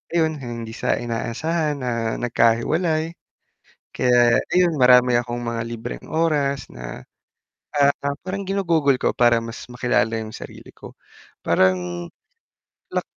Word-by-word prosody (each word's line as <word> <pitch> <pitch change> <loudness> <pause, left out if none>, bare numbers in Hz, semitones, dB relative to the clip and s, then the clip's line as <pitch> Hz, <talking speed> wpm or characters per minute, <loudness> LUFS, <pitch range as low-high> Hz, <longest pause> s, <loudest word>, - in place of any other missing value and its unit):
ayun 160 -2 +2
hindi 115 -3 -6
sa - - 0
inaasahan, 145 +7 -2
ah, 115 -2 -1
nagkahiwalay. 155 +8 +1 0.8
Kaya 120 -2 +4 0.2
ayun, 180 -1 +4
marami 125 -1 +6
akong 120 0 -3
mga 115 -1 -2
libreng 115 +1 -7
oras 145 -4 0
na, - - -8 0.7
ah, 140 -1 +5 0.3
parang 195 +1 -4
ginugugol 165 -8 +2
ko - - 0
para 120 -1 +4
mas 115 +1 -8
makilala 120 -2 0
yung 110 -1 -5
sarili - - -10
ko. - - -13 0.5
Parang, 90 -2 +1 0.8
lak - - -2
125 Hz, 120 wpm, -22 LUFS, 115-155 Hz, 0.8 s, marami